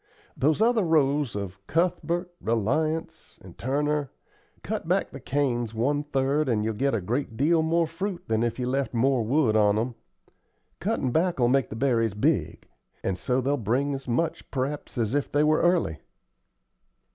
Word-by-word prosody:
Those 155 +9 +2
other 235 -1 +3
rows 145 - +2
of 100 -2 -5
Cuthbert, 175 +1 0
Reliance, 155 +9 -1
and - - -14
Turner, 145 +2 -1 0.5
cut - - -4
back - - +1
the - - -8
canes 120 -5 -1
one 140 +6 +1
third, 145 0 0
and 110 -3 +1
you'll 110 - 0
get 135 +4 0
a 110 - -1
great 115 +4 -3
deal 160 +5 +3
more 165 +1 +2
fruit 180 +3 -4
than 110 0 +1
if 120 -1 -1
you 125 - -2
left 135 0 -1
more 130 +1 +2
wood 115 0 +2
on 105 -1 +4
'em. 120 +3 -1 0.9
Cuttin' 185 - -1
back'll 160 -6 +2
make 135 0 +2
the - - -6
berries 115 -4 +1
big; 105 - 0 0.4
and 95 - 0
so 125 +7 0
they'll 140 +3 0
bring 130 +5 0
as 135 -1 -6
much, 160 +8 -1
p'raps, 140 +1 -3
as 115 -1 0
if 145 0 -1
they 145 +1 +3
were 155 +1 +3
early." 170 - +2
135 Hz, 170 wpm, -26 LUFS, 115-155 Hz, 0.9 s, on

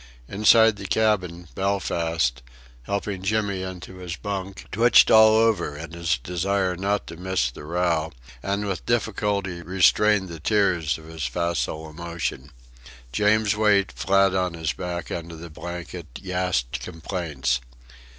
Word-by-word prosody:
Inside 110 - +5
the 100 -1 -6
cabin, 90 -3 0
Belfast, 85 -9 0 0.4
helping 100 +1 -3
Jimmy 100 -1 0
into 95 0 -7
his 90 -2 -5
bunk, 95 +1 -5
twitched 120 +3 +5
all 110 0 +8
over 110 -10 +2
in 80 +1 -8
his 85 -4 0
desire 90 +6 -1
not 100 +3 -1
to 85 - -9
miss 90 -8 0
all - - -11
the - - -10
row, 85 -1 0 0.3
and 100 +1 -2
with 95 -2 -3
difficulty 100 -6 -1
restrained 95 +3 +3
the 85 -2 -8
tears 90 -4 +1
of 80 - -14
his 80 -2 -5
facile 85 -2 -2
emotion. 80 -4 -5 0.6
James 105 - +2
Wait, 100 -3 +3
flat 95 -1 +2
on 90 -2 0
his 80 -2 -2
back 90 -2 -5
under 85 0 -5
the 85 0 -10
blanket, 85 +2 -7
gasped 90 -9 -2
complaints. 80 -7 -2
90 Hz, 140 wpm, -24 LUFS, 85-100 Hz, 0.6 s, all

